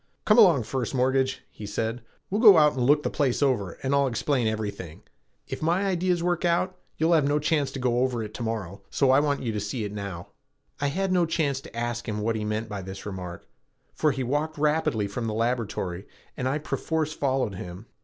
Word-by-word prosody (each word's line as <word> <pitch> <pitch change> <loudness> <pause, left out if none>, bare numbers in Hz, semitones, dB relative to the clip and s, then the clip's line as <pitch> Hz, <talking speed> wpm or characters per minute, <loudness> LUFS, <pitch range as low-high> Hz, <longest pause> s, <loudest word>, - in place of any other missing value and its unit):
"Come 210 +2 +5
along, 170 - +6
First 130 +2 -3
Mortgage," 130 +1 +1
he 105 - -8
said, 110 +3 -2 0.3
"we'll 205 +3 +1
go 210 -7 +9
out 150 -1 +5
and 130 - -3
look 145 +4 +4
the - - 0
place 140 -1 +1
over 105 -10 0
and 135 +1 0
I'll 140 -1 +3
explain 125 0 0
everything. 100 -7 -4 0.4
If - - -5
my 175 +5 +1
ideas 180 -2 +1
work 175 0 0
out, 175 +2 +1 0.2
you'll 160 +2 +3
have 155 -4 +4
no 145 +1 +2
chance 150 -1 +1
to 135 - -4
go 125 -1 +1
over 125 -3 0
it 105 0 -8
to - - -7
morrow, 105 -4 -4
so 135 -2 +3
I 135 - +6
want 145 -2 0
you 115 - -1
to 105 - -2
see 105 +3 -3
it 105 - -4
now." 100 -4 -6 0.5
I 145 - +1
had 190 +6 -1
no 180 -2 +3
chance 145 -4 0
to 115 - -12
ask 120 0 -3
him 105 - -2
what 115 +2 0
he 110 - -2
meant 105 +1 -2
by 105 -3 -5
this 95 +1 -8
remark, 90 -3 -7 0.5
for 155 - +2
he 135 0 -2
walked 150 +5 -1
rapidly 150 -7 +1
from 115 +3 -4
the 110 - -2
laboratory 110 -6 -2 0.3
and 130 - -2
I 135 +3 +1
perforce 155 0 -2
followed 130 -7 0
him. 90 +2 -8
130 Hz, 220 wpm, -26 LUFS, 110-150 Hz, 0.5 s, go